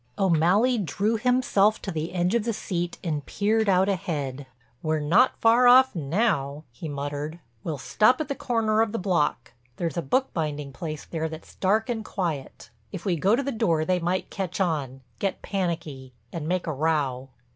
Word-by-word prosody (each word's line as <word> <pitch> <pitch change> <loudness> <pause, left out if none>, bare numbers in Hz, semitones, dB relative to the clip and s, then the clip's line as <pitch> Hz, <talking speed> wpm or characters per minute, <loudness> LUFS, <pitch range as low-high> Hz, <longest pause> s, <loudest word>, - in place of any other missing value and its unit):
O'Malley 195 +7 +3
drew 205 +4 0
himself 225 -3 +2
to 195 - -5
the 160 0 -3
edge 180 +2 0
of 235 -2 +2
the 230 +1 -1
sea 175 -4 -2
and 155 -5 -2
peered 215 +1 +1
out 190 0 +4
ahead. 145 -8 -3 0.3
"We're 155 -1 0
not 180 - +3
far 235 +2 +5
off 260 +2 +7
now," 150 -3 0
he 140 +7 -7
muttered. 145 +3 -4 0.2
"We'll 155 -3 -3
stop 215 - +3
at 310 - -2
the 280 - -1
corner 225 -4 +1
of 225 -1 0
the - - 0
block—there's 150 - -2
a - - +1
bookbinding 150 - -1
place 155 0 -6
there 160 -1 -3
that's 160 0 -10
dark 210 +4 +1
and 230 -3 -2
quiet. 165 -14 -4 0.2
If 170 - -7
we 185 -3 +1
go 190 +7 +3
to 275 - -1
the 275 - -2
door 170 -10 +1
they 180 +2 +1
might 175 +2 -2
catch 190 -2 -4
on, 145 -8 -1 0.2
get 195 - -2
panicky, 165 -9 -3 0.2
and 160 -2 -4
make 180 +1 0
a 160 - -2
row." 140 -3 -1
175 Hz, 180 wpm, -26 LUFS, 150-215 Hz, 0.3 s, off